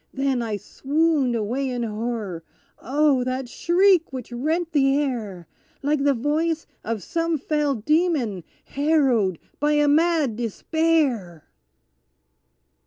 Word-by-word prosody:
Then 270 -2 0
I 220 -3 -2
swooned 285 - 0
away 240 +5 -1
in 245 -1 -2
horror. 215 -5 -4 0.4
Oh! 280 0 +2
that 255 0 -3
shriek 350 +5 +3
which 255 -2 -7
rent 320 +8 -1
the 275 -2 +3
air, 220 -11 -3 0.4
Like 290 0 +1
the 280 -1 +3
voice 310 +6 -1 0.2
of 220 -4 -3
some 330 - -1
fell 295 -1 0
demon 260 - 0 0.2
harrowed 270 - +1 0.2
by 295 +1 +2
a 295 0 +3
mad 305 -5 +2
despair. 245 - 0
275 Hz, 115 wpm, -23 LUFS, 235-310 Hz, 0.4 s, shriek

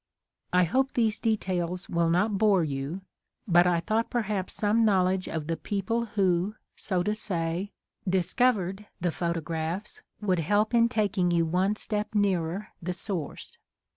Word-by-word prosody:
I 180 0 +4
hope 260 +10 +1
these 220 -3 +1
details 185 -5 -1
will 170 -1 +1
not 195 +4 +2
bore 205 -5 +4
you, 145 +5 -3 0.5
but 175 -1 +5
I 175 -1 +3
thought 220 +6 0
perhaps 210 -6 -2
some 220 +1 +2
knowledge 190 -3 +2
of 160 -2 -3
the 165 +1 -1
people 220 +6 -2
who, 185 +1 +2 0.2
so 185 -3 -1
to 210 - 0
say, 180 -2 -2 0.4
''discovered'^ 195 +1 +1
the 175 0 0
photographs 170 +3 -3 0.2
would 185 -4 +1
help 210 +7 +1
in 235 0 +5
taking 200 -5 +1
you 170 -1 +2
one 185 +5 +1
step 210 0 -2
nearer 190 -1 0
the 180 +1 -2
source. 180 -5 -5
190 Hz, 145 wpm, -28 LUFS, 170-210 Hz, 0.5 s, but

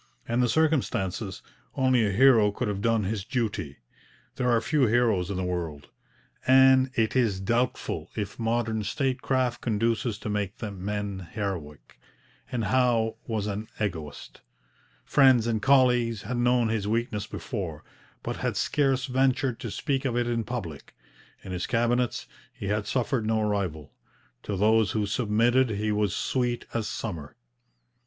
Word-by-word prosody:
In 120 +1 0
the 125 -1 +3
circumstances, 115 - 0 0.3
only 130 -3 +3
a 100 - +1
hero 115 -1 +5
could 120 +4 -3
have 100 -1 -2
done 115 -1 +2
his 100 0 -2
duty. 105 - -3 0.6
There 125 -1 0
are 120 -1 +4
few 140 +2 +2
heroes 110 -6 +2
in 100 - -3
the 95 - -1
world, 85 -5 -4 0.6
and 130 0 +6
it 110 +1 +1
is 115 -7 +2
doubtful 120 +6 -1
if 105 0 -4
modern 115 -1 0
statecraft 130 +1 -1
conduces 115 0 0
to 110 - -8
make 105 -2 -2
men 100 -2 -4
heroic. 90 -9 -5 0.5
And 120 -2 -1
Howe 120 -3 +2
was 110 -4 -2
an 105 +1 -4
egoist. 80 -8 -5 0.6
Friends 130 -5 +5
and 115 -2 0
colleagues 125 -4 +3
had 125 - -3
known 120 -1 +2
his 110 -2 -1
weakness 110 -1 -1
before, 90 - -5 0.4
but - - -3
had - - -2
scarce 135 -3 +1
ventured 130 -1 +1
to 115 - -5
speak 135 +5 -2
of 125 -3 -1
it 120 - +1
in 115 -1 0
public. 90 - -6 0.5
In 95 - -8
his 90 -1 -3
cabinets 120 +1 0 0.3
he 100 - -6
had 105 0 -1
suffered 125 -2 0
no 110 -1 +1
rival. 90 -8 -3 0.5
To 100 - -4
those 110 +1 +3
who 105 -1 0
submitted 120 +4 +2
he 105 0 -1
was 105 -2 0
sweet 120 -2 -1
as 115 -2 -1
summer. 80 -10 -5
110 Hz, 150 wpm, -27 LUFS, 100-125 Hz, 0.6 s, and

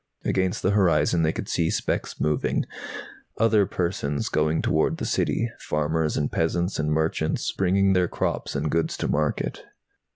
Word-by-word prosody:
Against 95 -1 0
the 95 - +3
horizon 90 -4 +3
they 80 -1 +2
could - - -5
see 85 -1 +1
specks - - -2
moving, 75 -1 0 0.7
other 110 -3 +4
persons 85 -5 -2
going 75 +1 +1
toward - - +1
the - - -3
City, 115 0 0
farmers 75 +1 -1
and 75 - 0
peasants 85 +3 0
and 75 0 0
merchants, 80 0 0
bringing 95 +1 +2
their 90 -1 +3
crops - - -2
and 75 +2 -1
goods 85 0 0
to - - -2
market. 75 0 -1
80 Hz, 155 wpm, -25 LUFS, 75-95 Hz, 0.7 s, other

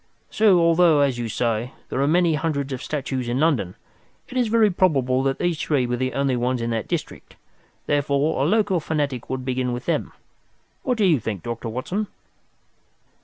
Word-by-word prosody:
So, 210 -5 +4
although, 165 -2 +4
as 135 -4 +1
you 115 -1 -3
say, 115 +2 -1 0.2
there 130 - -1
are 140 - +2
many 170 +1 +3
hundreds 140 -2 -2
of 130 - -5
statues 135 -4 -3
in 125 +2 0
London, 135 - +1 0.5
it - - -10
is 250 -2 +2
very 220 -2 +4
probable 135 -8 +2
that 135 0 0
these 175 -3 -1
three 140 -5 +1
were 125 0 -1
the 130 +1 -2
only 140 -2 +1
ones 125 +1 0
in 115 0 -2
that 115 -1 -2
district. - - -5 0.5
Therefore, 145 0 +1
a 140 - +2
local 205 -2 +2
fanatic 145 -6 -2
would 130 -1 -3
begin 125 -1 -1
with 120 - -5
them. - - -1 0.7
What 250 -3 -1
do 210 - +3
you 165 -7 +4
think, 105 -6 -5
Dr. 115 0 -4
Watson?" 180 - -3
140 Hz, 185 wpm, -23 LUFS, 125-165 Hz, 0.7 s, So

